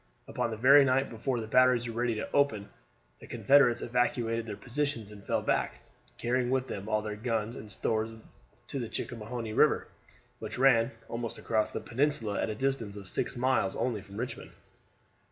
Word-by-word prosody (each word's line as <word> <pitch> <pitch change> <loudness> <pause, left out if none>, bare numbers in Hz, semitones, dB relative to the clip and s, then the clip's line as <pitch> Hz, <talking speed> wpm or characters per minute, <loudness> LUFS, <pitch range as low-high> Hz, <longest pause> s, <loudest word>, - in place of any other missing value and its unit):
Upon 120 -1 -2
the 110 - -5
very 140 +5 +7
night 135 0 +1
before 120 +2 -2
the 110 - -4
batteries 125 +1 +4
were 115 - -5
ready 120 0 0
to 110 - -5
open, 110 -8 +1 0.5
the - - -12
Confederates 135 -4 +4
evacuated 115 -1 0
their 105 -2 -5
positions 125 -4 -3
and 100 -1 -12
fell - - -1
back, - - -1 0.3
carrying 125 +1 0
with 130 0 +1
them 100 +1 -6
all 110 -1 +1
their 105 -1 -4
guns 115 0 -2
and 105 - -9
stores 110 +2 -1 0.5
to 140 - -4
the 115 -3 -4
Chickahominy 115 -1 -5
River, - - +3 0.5
which - - -6
ran 125 -3 +5 0.2
almost 115 -1 -4
across 110 -2 0
the - - -5
peninsula 125 -2 0
at - - -1
a 110 - -3
distance 125 -5 -2
of 100 -2 -9
six - - -2
miles 125 -6 +1
only 115 -5 -1
from 100 +1 -12
Richmond. 125 +2 -5
115 Hz, 180 wpm, -30 LUFS, 110-130 Hz, 0.5 s, very